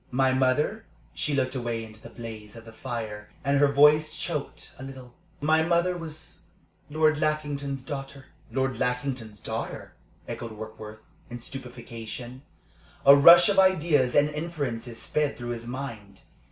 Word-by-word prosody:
"My 130 Hz, +1 st, +2 dB
mother" 130 Hz, +11 st, +1 dB, 0.3 s
she 150 Hz, -, -1 dB
looked 130 Hz, -1 st, 0 dB
away 120 Hz, -3 st, -2 dB
into 110 Hz, -1 st, -13 dB
the -, -, -11 dB
blaze 110 Hz, -3 st, -9 dB
of 115 Hz, 0 st, -11 dB
the 115 Hz, -, -12 dB
fire, 110 Hz, -3 st, -6 dB, 0.2 s
and 140 Hz, 0 st, +3 dB
her 145 Hz, -1 st, +4 dB
voice 150 Hz, +2 st, +5 dB
choked 170 Hz, -5 st, -4 dB
a -, -, -7 dB
little 130 Hz, -2 st, -10 dB, 0.3 s
"my 155 Hz, +2 st, +3 dB
mother 170 Hz, +2 st, +2 dB
was 160 Hz, -1 st, -8 dB, 0.5 s
Lord 155 Hz, 0 st, +2 dB
Lackington's 145 Hz, -3 st, -2 dB
daughter." 135 Hz, -1 st, -6 dB, 0.3 s
"Lord 130 Hz, -2 st, -1 dB
Lackington's 125 Hz, -4 st, -2 dB
daughter?" -, -, -5 dB, 0.3 s
echoed 115 Hz, -2 st, -6 dB
Warkworth, 110 Hz, 0 st, -9 dB, 0.3 s
in 120 Hz, -, -6 dB
stupefaction. 120 Hz, -1 st, -8 dB, 0.6 s
A 140 Hz, +1 st, +10 dB
rush 170 Hz, +7 st, +9 dB
of 200 Hz, -2 st, +3 dB
ideas 160 Hz, -9 st, +3 dB
and 145 Hz, 0 st, +5 dB
inferences 140 Hz, -8 st, -4 dB
sped 145 Hz, -4 st, -1 dB
through 120 Hz, 0 st, -6 dB
his 120 Hz, -1 st, -5 dB
mind. 115 Hz, -7 st, -7 dB
135 Hz, 145 wpm, -27 LUFS, 115-150 Hz, 0.6 s, A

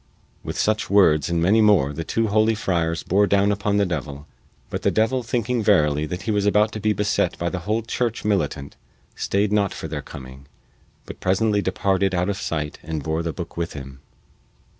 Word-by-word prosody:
With -, -, -5 dB
such 110 Hz, 0 st, 0 dB
words 80 Hz, -7 st, +4 dB
and 85 Hz, -1 st, 0 dB
many 105 Hz, +5 st, +4 dB
more 100 Hz, -10 st, +4 dB
the 80 Hz, +3 st, -4 dB
two 110 Hz, +6 st, -1 dB
holy 110 Hz, +2 st, +3 dB
friars 85 Hz, -5 st, -1 dB
bore 100 Hz, +3 st, +2 dB
down 100 Hz, 0 st, +3 dB
upon 105 Hz, 0 st, 0 dB
the 100 Hz, -, +3 dB
devil; 75 Hz, -5 st, -5 dB, 0.5 s
but -, -, -3 dB
the -, -, +2 dB
devil 120 Hz, +4 st, +1 dB
thinking 120 Hz, 0 st, -1 dB
verily 75 Hz, -8 st, +2 dB
that 90 Hz, +3 st, -5 dB
he 115 Hz, -, -1 dB
was 105 Hz, -1 st, +1 dB
about 105 Hz, +1 st, +3 dB
to 110 Hz, -, -5 dB
be 110 Hz, +1 st, +1 dB
beset 105 Hz, -1 st, 0 dB
by 85 Hz, -, -1 dB
the 95 Hz, -, -3 dB
whole 110 Hz, +1 st, +1 dB
church 115 Hz, 0 st, -2 dB
militant 75 Hz, -9 st, -1 dB, 0.4 s
stayed 100 Hz, +1 st, 0 dB
not 100 Hz, -2 st, +1 dB
for -, -, -6 dB
their 75 Hz, -2 st, -4 dB
coming, 65 Hz, 0 st, -11 dB, 0.6 s
but -, -, -10 dB
presently 105 Hz, +2 st, +1 dB
departed 95 Hz, 0 st, 0 dB
out 90 Hz, +2 st, 0 dB
of 100 Hz, -, -2 dB
sight 75 Hz, -2 st, -3 dB
and 80 Hz, -2 st, -5 dB
bore 80 Hz, +2 st, -1 dB
the 85 Hz, 0 st, -2 dB
book 85 Hz, +1 st, -7 dB
with 85 Hz, -1 st, -3 dB
him. 70 Hz, -2 st, -9 dB
95 Hz, 200 wpm, -22 LUFS, 80-105 Hz, 0.6 s, words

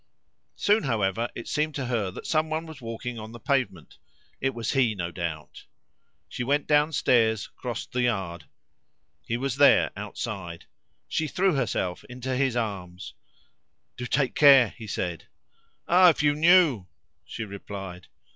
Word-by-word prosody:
Soon, 210 Hz, +2 st, +3 dB
however, 110 Hz, -2 st, 0 dB
it 115 Hz, -, -7 dB
seemed 150 Hz, +1 st, -1 dB
to 135 Hz, -, -3 dB
her 115 Hz, -6 st, -1 dB
that 90 Hz, -, -9 dB
someone 155 Hz, +1 st, 0 dB
was 160 Hz, -4 st, -11 dB
walking 115 Hz, +1 st, -6 dB
on 110 Hz, +1 st, -9 dB
the 120 Hz, -, -9 dB
pavement. 120 Hz, -, -2 dB, 0.4 s
It 135 Hz, -1 st, -1 dB
was 115 Hz, -2 st, -2 dB
he, 125 Hz, -6 st, +2 dB
no 85 Hz, -2 st, -4 dB
doubt. 85 Hz, -4 st, -6 dB, 0.6 s
She -, -, -5 dB
went 145 Hz, +3 st, +1 dB
downstairs, 130 Hz, -8 st, +2 dB
crossed 120 Hz, -3 st, -6 dB
the 125 Hz, -, 0 dB
yard. 95 Hz, -9 st, -2 dB, 0.8 s
He 115 Hz, -, -1 dB
was 135 Hz, 0 st, -2 dB
there -, -, +5 dB
outside. 95 Hz, -7 st, -6 dB, 0.4 s
She 160 Hz, -, -1 dB
threw 185 Hz, +4 st, +1 dB
herself 100 Hz, -9 st, -2 dB
into 125 Hz, +1 st, -5 dB
his 130 Hz, -2 st, +1 dB
arms. 95 Hz, -6 st, -4 dB, 0.8 s
"Do 125 Hz, -, -5 dB
take 135 Hz, 0 st, +1 dB
care!" 135 Hz, -6 st, +7 dB
he 110 Hz, -, -11 dB
said. 90 Hz, -4 st, -4 dB, 0.6 s
"Ah! 180 Hz, +1 st, +7 dB
if 155 Hz, -, +1 dB
you 145 Hz, -1 st, +4 dB
knew!" 155 Hz, -, +4 dB, 0.4 s
she 115 Hz, -, -6 dB
replied. 95 Hz, -3 st, -8 dB
120 Hz, 145 wpm, -26 LUFS, 100-140 Hz, 0.8 s, care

